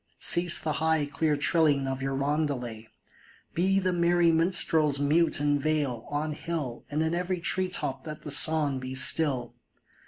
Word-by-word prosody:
Cease 175 0 +6
the 155 - -3
high, 160 -2 0
clear 150 +1 -2
trilling 145 -2 0
of 135 0 -5
your 135 0 -3
roundelay! 135 -6 -4 0.7
Be 190 +3 0
the 185 -1 -1
merry 170 0 +1
minstrels 160 -3 +2
mute 155 +4 +1
in 145 0 0
vale, 140 -6 -3
on 150 +1 -4
hill, 150 -6 -6
And 150 +2 -2
in 160 +1 -2
every 180 +1 -3
tree 185 +2 -1
top 135 -5 -3
let 155 0 -9
the 150 - -4
song 145 -2 +4
be 130 0 -8
still 130 -3 +2
150 Hz, 160 wpm, -26 LUFS, 140-165 Hz, 0.7 s, Cease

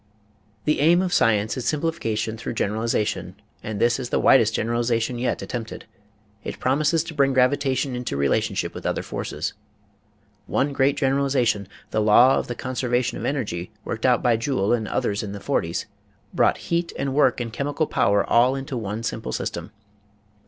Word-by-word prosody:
The 150 - +2
aim 165 +4 +5
of 180 -1 -2
science 110 -7 +2
is 125 - -3
simplification 145 -9 -1
through 115 +1 -5
generali 110 +1 -1
zation 105 -5 -1 0.3
and 105 -2 -5
this 120 +2 +2
is 125 -2 -4
the - - +1
widest 115 -5 +5
generalization 120 +1 0
yet 125 - -1
at - - -9
tempted. 115 -3 -5 0.6
It - - -6
promises 150 +5 +2
to 165 - -8
bring 140 -3 +2
gravitation 130 0 +1
into 125 - -3
rela 70 +8 +2
tionship 100 -6 -3
with - - -8
other - - -1
forces. - - -4 0.9
One 140 +1 0
great 140 0 +2
generalization, 130 -6 +1 0.2
the 110 - +1
law 120 +5 +6
of - - -5
the 120 - -4
conservation 125 -1 -1
of - - -4
energy 105 -11 -2 0.2
worked 115 +2 -1
out 125 -2 +3
by 120 -3 +3
Joule 115 -4 0
and 110 -3 0
others 100 0 -1
in 100 -2 -5
the 100 - -6
forties, - - -1 0.5
brought - - +3
heat 170 0 +1
and 135 -1 -2
work 135 -3 +3
and 115 -2 -4
chemical 145 +5 -1
power 100 -7 +2
all 125 +3 +4
into 135 0 -5
one 110 0 -4
simple 65 - -3
system. - - -4
120 Hz, 175 wpm, -23 LUFS, 110-135 Hz, 0.9 s, law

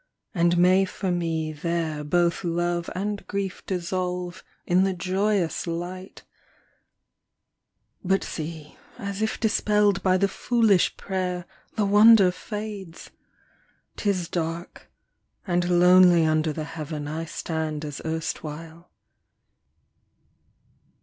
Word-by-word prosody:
And 175 -2 +2
may 185 +2 +5
for 190 0 -3
me 165 -3 -1
there 160 -1 -2
Both 170 +4 +1
love 175 0 -1
and 205 +2 -3
grief 200 -2 -4
dissolve 180 -1 -3 0.2
in 180 +2 +3
the 190 -1 0
joyous 190 -1 0
light! 180 +3 -6 1.8
But 190 +1 +1
see, 155 -1 -7 0.2
as 200 -3 -5
if 220 - -1
dispelled 210 -3 +2
by 185 0 +3
the 200 +1 +2
foolish 220 -3 +2
prayer, 180 -2 -3 0.3
The 215 - +1
wonder 205 -1 +7
fades! 205 -3 -7 0.8
'Tis 190 -5 -1
dark, 170 0 -5 0.6
and 175 -2 0
lonely 180 -1 +6
Under 155 0 +1
the 155 +1 -4
heaven 155 -1 -6
I 160 +2 -4
stand 160 -2 -4
as 145 -2 -6
erstwhile. 160 +1 -5
180 Hz, 105 wpm, -25 LUFS, 165-195 Hz, 1.8 s, wonder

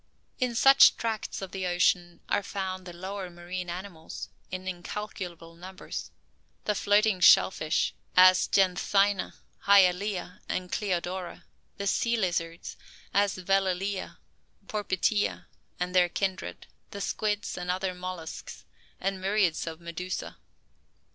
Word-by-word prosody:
In 250 -2 0
such 270 +3 +7
tracts 220 -3 -3
of 190 - -7
the 190 -1 -3
ocean 175 0 +1
are 205 - +1
found 190 -2 -4
the - - -6
lower 190 +2 -6
marine 175 +1 -6
animals, 175 -2 -7 0.2
in 185 +1 -6
incalculable 180 -2 -6
numbers; 185 +3 -7 0.6
the 210 - +2
floating 205 0 +3
shell 180 - +7
fish, 155 -4 0 0.2
as 185 0 +7
Janthina, 195 +1 +2 0.3
Hyalaea 190 -1 +3
and 180 -1 -3
Cleodora; 180 -2 -3 0.3
the 200 - -4
sea 235 +4 +1
lizards, 170 -4 -2 0.4
as 200 0 +2
Velellae, 195 +1 0 0.5
Porpitae, 205 0 0 0.3
and 180 0 -2
their 180 -1 +4
kindred; 190 +1 -3 0.2
the 200 - -7
squids, 210 +1 -2
and 180 0 -5
other 185 +1 -1
molluscs; 180 -3 -7 0.4
with 195 +1 0
myriads 190 -3 0
of 160 0 -5
medusa. 175 +2 -5
185 Hz, 120 wpm, -28 LUFS, 180-200 Hz, 0.6 s, such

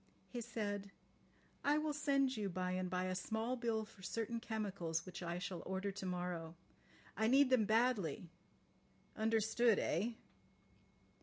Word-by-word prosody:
He 245 - -4
said: 205 -3 -3 0.7
"I 290 +1 +4
will 305 0 0
send 275 -2 +2
you 210 -3 -1
by 180 0 -1
and 185 0 -1
by 180 0 0
a 185 0 -1
small 220 +6 -1
bill 230 -3 0
for 205 -3 -17
certain 230 +4 -2
chemicals 200 -8 -2
which 185 - -7
I 170 0 -2
shall 180 -1 -4
order 190 +2 -2
to 195 0 -6
morrow. 175 -2 -3 0.6
I 220 +3 +2
need 265 +2 +6
them 240 -5 +5
badly. 215 - +2 0.9
Understood—eh?" 220 -2 +2
210 Hz, 140 wpm, -38 LUFS, 185-235 Hz, 0.9 s, need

